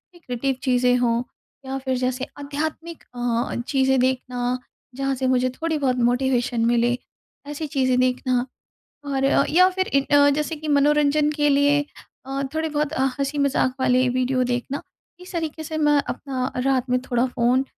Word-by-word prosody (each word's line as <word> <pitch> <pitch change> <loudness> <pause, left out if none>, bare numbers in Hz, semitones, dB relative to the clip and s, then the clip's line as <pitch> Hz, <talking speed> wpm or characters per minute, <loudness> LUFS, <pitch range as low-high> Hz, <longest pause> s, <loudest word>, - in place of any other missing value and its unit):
Creative 270 -4 -3
चीज़ें 250 -1 +3
हों, 235 -1 +1 0.4
या 265 0 -3
फिर 260 -1 -2
जैसे 255 +1 -1
आध्यात्मिक 315 +3 -5
अ, 240 -1 -1
चीज़ें 265 -1 +2
देखना 250 -1 0 0.4
जहाँ 270 0 -1
से 260 0 -1
मुझे 255 0 +2
थोड़ी-बहुत 290 -2 -1
मोटिवेशन 245 -2 0
मिले। 240 +1 +2 0.5
ऐसी 295 +1 -4
चीज़ें 255 -3 +1
देखना 255 0 +1 0.6
और 270 -1 -1
अ, 275 0 +4
या 365 +4 +5
फिर 375 0 -2
ए 275 - +5
अ, 285 0 +6
जैसे 300 +3 -1
कि 310 0 -8
मनोरंजन 295 +1 +3
के 295 -1 +1
लिए 285 +1 +4 0.5
अ, 270 +1 -3
थोड़े-बहुत 305 -2 -1
अ, 265 - +1
हँसी-मज़ाक 280 -2 +1
वाले 255 0 +3
वीडियो 255 +1 +1
देखना। 245 +3 -3 0.4
इस 360 - -11
तरीके 320 -2 -3
से 315 0 -4
मैं 295 -1 +3
अपना 260 -2 -3
रात 260 -2 +1
में 250 0 +2
थोड़ा 245 -1 0
फ़ोन 250 +1 +1
265 Hz, 155 wpm, -23 LUFS, 250-295 Hz, 0.6 s, अ